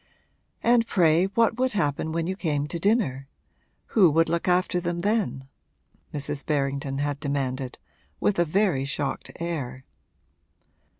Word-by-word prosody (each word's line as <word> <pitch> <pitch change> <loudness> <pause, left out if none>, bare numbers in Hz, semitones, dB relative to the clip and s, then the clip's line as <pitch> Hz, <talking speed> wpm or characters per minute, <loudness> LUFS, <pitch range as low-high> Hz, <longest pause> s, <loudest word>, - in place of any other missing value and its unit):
'And 235 -1 +4
pray 170 -3 +4
what 230 +3 +1
would 260 -2 +1
happen 160 -5 0
when 165 0 -1
you 190 +2 -2
came 150 -6 -1
to 170 +3 -4
dinner? 165 - +1 0.6
Who 195 -6 +5
would 165 +2 +3
look 170 +1 -1
after 180 0 +2
them 175 0 -2
then?' 200 -10 -1 0.6
Mrs. 145 0 -2
Berrington 140 -1 -1
had 145 0 -1
demanded, 135 -3 -2 0.4
with 200 -3 +1
a - - +6
very 175 -4 +1
shocked 140 0 -3
air. 135 -7 -4
160 Hz, 135 wpm, -26 LUFS, 140-190 Hz, 0.6 s, a